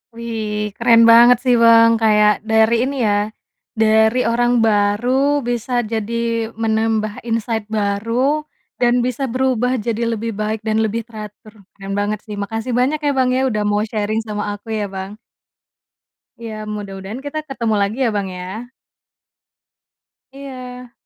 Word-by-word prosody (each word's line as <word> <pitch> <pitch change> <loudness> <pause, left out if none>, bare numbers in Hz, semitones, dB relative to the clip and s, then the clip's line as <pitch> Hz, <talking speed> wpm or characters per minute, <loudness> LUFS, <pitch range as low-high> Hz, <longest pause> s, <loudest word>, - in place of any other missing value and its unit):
Wih, 215 -3 -4
keren 230 -1 +5
banget 240 +1 +7
sih 250 -2 +3
Bang, 230 0 +6
kayak 210 -2 +3
dari 220 +1 +3
ini 275 +2 -2
ya, 205 +1 0 0.5
dari 220 +2 +4
orang 240 +1 +2
baru 240 +7 +2
bisa 240 +1 -3 0.2
jadi 230 +1 -2
menambah 220 -1 -1
insight 225 -1 -2
baru 230 +8 0 0.3
dan 245 0 +2
bisa 255 +2 -3
berubah 255 -1 +1
jadi 230 +1 -2
lebih 225 -1 -3
baik 215 +1 -2
dan 220 0 +1
lebih 225 +1 -3
teratur, 215 -1 -11 0.2
keren 195 0 -5
banget 210 0 -1
sih. 210 - -6
Makasih 225 +4 -3
banyak 265 +5 +1
ya 290 -2 0
Bang 260 -1 +2
ya 260 +1 +1
udah 215 -4 -1
mau 210 +1 0
sharing 215 0 -2
sama 210 -1 -3
aku 205 +2 -9
ya 205 -2 -3
Bang. 190 +1 -6 1.2
Iya 230 -2 -7 0.2
mudah-mudahan 200 +2 -7
kita 300 +2 -3
ketemu 230 -5 -1
lagi 200 +4 -1
ya, 235 - +2
Bang, 200 -1 -1
ya. 190 +7 -7 1.6
Iya. 255 -3 -9
225 Hz, 140 wpm, -19 LUFS, 210-245 Hz, 1.6 s, banget